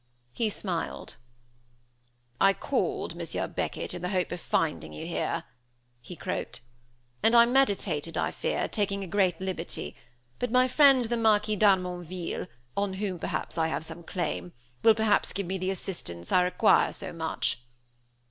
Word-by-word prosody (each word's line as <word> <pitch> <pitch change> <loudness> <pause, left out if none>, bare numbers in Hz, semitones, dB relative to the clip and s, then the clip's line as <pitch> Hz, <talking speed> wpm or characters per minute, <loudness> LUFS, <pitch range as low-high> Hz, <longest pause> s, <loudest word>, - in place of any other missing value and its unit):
He 220 - 0
smiled. 180 -5 -4 1.2
"I 195 0 +6
called, - - -1
Monsieur - - -3
Beckett, - - -3
in 175 - -6
the 180 - -2
hope 185 -3 0
of 175 - -4
finding 80 - -1
you 75 - -6
here," - - -2 0.6
he - - -9
croaked, - - -4 0.6
"and 225 +2 +4
I 235 0 +9
meditated, 200 - +1
I - - 0
fear, - - -1
taking 200 -2 -1
a - - -6
great 190 -1 +2
liberty, 185 -3 -4 0.4
but 245 - -1
my 255 +1 +5
friend 270 -2 +6
the 235 +1 -1
Marquis 215 -1 +3
d'Harmonville, 180 -3 +1 0.3
on 200 -1 0
whom 190 -2 -3
I - - -2
have - - -2
perhaps 160 -1 -1
some 160 +1 -8
claim, 90 - -3 0.3
will 225 -1 +6
perhaps 220 -1 +2
give 200 0 -2
me 190 +2 -3
the 185 +1 -1
assistance 170 - -5
I 180 - +5
require 180 +5 +4
so 190 - -6
much." 160 -6 -1
190 Hz, 155 wpm, -28 LUFS, 170-215 Hz, 1.2 s, I